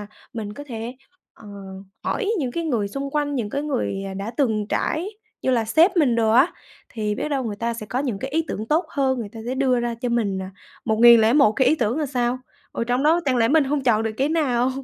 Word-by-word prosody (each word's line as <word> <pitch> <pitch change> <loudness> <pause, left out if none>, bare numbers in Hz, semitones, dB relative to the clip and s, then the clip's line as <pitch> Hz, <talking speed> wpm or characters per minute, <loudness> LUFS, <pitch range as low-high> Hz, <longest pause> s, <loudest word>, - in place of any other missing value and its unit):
là 205 - -7 0.3
mình 215 -3 -5
có 290 +6 -9
thể, 235 0 -6 0.4
ờ, 215 - -16 0.6
hỏi 430 -2 -1
những 260 -5 -1
cái 335 0 -3
người 225 -10 0
xung 275 +5 -5
quanh, 290 -1 -1
những 225 -5 -2
cái 280 +4 -2
người, 250 -9 -2
à, 190 - -6
đã 200 +4 -4
từng 220 -7 +1
trải 335 +6 -1 0.3
như - - +1
là 235 -3 +2
sếp 330 - +4
mình 275 -8 +3
đồ 220 -1 +2
á, 260 +9 +4 0.4
thì 210 -2 -2
biết 300 - -3
đâu 270 -3 -1
người 210 -3 -4
ta 235 +2 -2
sẽ 215 -2 -7
có 245 - -2
những 250 -8 -2
cái 265 +4 -5
ý 320 +2 0
tưởng 215 +2 -4
tốt 325 +4 +2
hơn, 265 -3 0
người 220 -3 -4
ta 225 - -8
sẽ 255 - -2
đưa 260 -2 +2
ra 240 -1 -2
cho 245 +1 -4
mình 215 -5 0
là 190 0 -6 0.3
1001 230 +2 +6
cái 260 +2 +3
ý 310 - +4
tưởng 245 0 -1
là 300 - 0
sao. 250 -1 -1 0.3
Ở 230 - -2
trong 245 +3 0
đó 325 +3 +4
chẳng 260 -2 +1
lẽ 230 -1 +3
mình 310 -1 +4
hông 285 +1 0
chọn 225 -3 +3
được 225 - -1
cái 275 +2 +1
nào? 265 -6 +1
245 Hz, 250 wpm, -23 LUFS, 225-280 Hz, 0.6 s, 1001